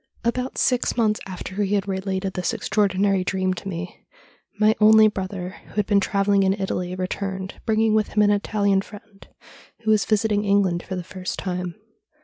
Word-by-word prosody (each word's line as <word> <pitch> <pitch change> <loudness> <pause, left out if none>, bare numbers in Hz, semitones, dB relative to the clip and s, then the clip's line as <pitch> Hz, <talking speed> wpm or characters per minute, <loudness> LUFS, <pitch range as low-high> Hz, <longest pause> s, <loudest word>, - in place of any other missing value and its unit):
' - - -38
About 250 +3 -2
six 250 -1 +1
months 215 -2 +2
after 185 +1 -5
he 205 0 +1
had 200 0 -1
related 190 0 -2
this 180 +5 -2
extraordinary 200 -3 +1
dream 185 0 0
to 185 - -8
me, 180 -1 -6 0.6
my 215 0 +5
only 215 0 +7
brother, 190 -2 -4
who - - -16
had 210 -1 +1
been 200 -1 +3
travelling 200 0 +2
in 190 0 +3
Italy, 180 -2 -2
returned, 190 +1 -4
bringing 220 0 +2
with 215 -1 +2
him 210 - +4
an 205 - +4
Italian 200 -1 +1
friend, 205 0 -14 0.5
who 220 -1 +1
was 215 -2 +3
visit 215 0 +1
ing 205 0 +1
England 200 -4 +2
for 185 - -6
the 180 - -4
first 185 +1 -6
time. 180 -2 -4
200 Hz, 185 wpm, -23 LUFS, 190-210 Hz, 0.6 s, only